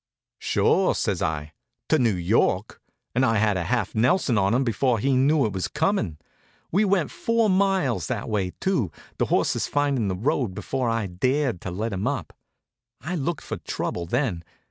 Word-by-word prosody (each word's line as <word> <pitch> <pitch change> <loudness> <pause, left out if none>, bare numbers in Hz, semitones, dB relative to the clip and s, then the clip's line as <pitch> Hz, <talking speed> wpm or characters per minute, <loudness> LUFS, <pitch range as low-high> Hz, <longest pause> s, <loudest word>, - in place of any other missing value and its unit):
"Sure," - - +2
says - - -1
I, 75 -1 -2 0.4
"to - - +4
New 115 -5 +2
York," 90 +2 +1 0.3
and 125 - +2
I 115 -4 +3
had 105 -1 +2
a 90 -2 -2
half - - -1
Nelson 125 +3 +2
on 100 -1 +2
him 125 +4 +2
before 125 0 +1
he 135 +5 +1
knew 140 +2 +3
it 105 - -2
was 95 -1 -2
coming. 160 - 0 0.5
We 195 +6 +3
went 195 -6 +1
four 230 -2 +1
miles 185 - +1
that - - -3
way, 100 -5 -1
too, 180 - 0 0.3
the - - +3
horses - - +1
finding 140 -6 +1
the 95 - -1
road, 120 - -1
before 120 +5 -2
I 115 -2 0
dared 125 +4 0
let 105 +5 -3
him 95 +1 -2
up. - - -3 0.7
I 165 +5 -5
looked 165 -1 -2
for - - -5
trouble 85 -1 -4
then. 115 - -1
120 Hz, 175 wpm, -25 LUFS, 95-145 Hz, 0.7 s, to